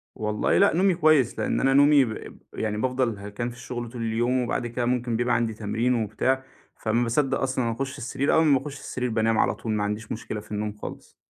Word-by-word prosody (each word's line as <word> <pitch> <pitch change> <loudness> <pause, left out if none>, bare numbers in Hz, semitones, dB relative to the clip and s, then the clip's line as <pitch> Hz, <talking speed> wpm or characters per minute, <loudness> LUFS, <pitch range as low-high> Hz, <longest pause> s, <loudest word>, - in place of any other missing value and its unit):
والله 105 -1 0
لا 200 - +5
نومي 185 +1 +3
كويّس، 155 -7 +3
لأن - - 0
أنا 135 0 +3
نومي 145 0 +6
ب 110 -2 -7 0.2
يعني 105 -1 -2
بافضل 125 -2 0
هلكان 105 +4 -4
في 120 - -10
الشغل 120 -1 -6
طول 120 0 -7
اليوم 120 +3 +1
وبعد 120 0 -2
كده 120 +1 -2
ممكن 120 -1 0
بيبقى 120 +1 +1
عندي 115 -2 0
تمرين 115 +3 0
وبتاع، 130 +5 0 0.3
فما 115 +2 0
باصدق 135 +3 +1
أصلًا 130 -3 0
أخش 135 +4 -4
السرير 135 +2 -1
أول 160 - +4
ما 145 -3 +5
باخش 140 +1 -8
السرير 125 -1 -3
بانام 110 0 +1
على - - +2
طول 115 - -5
ما 105 -1 0
عنديش 105 +2 -4
مشكلة 110 -1 -4
في 105 - -14
النوم 105 0 -2
خالص. - - -9
120 Hz, 215 wpm, -25 LUFS, 110-135 Hz, 0.3 s, نومي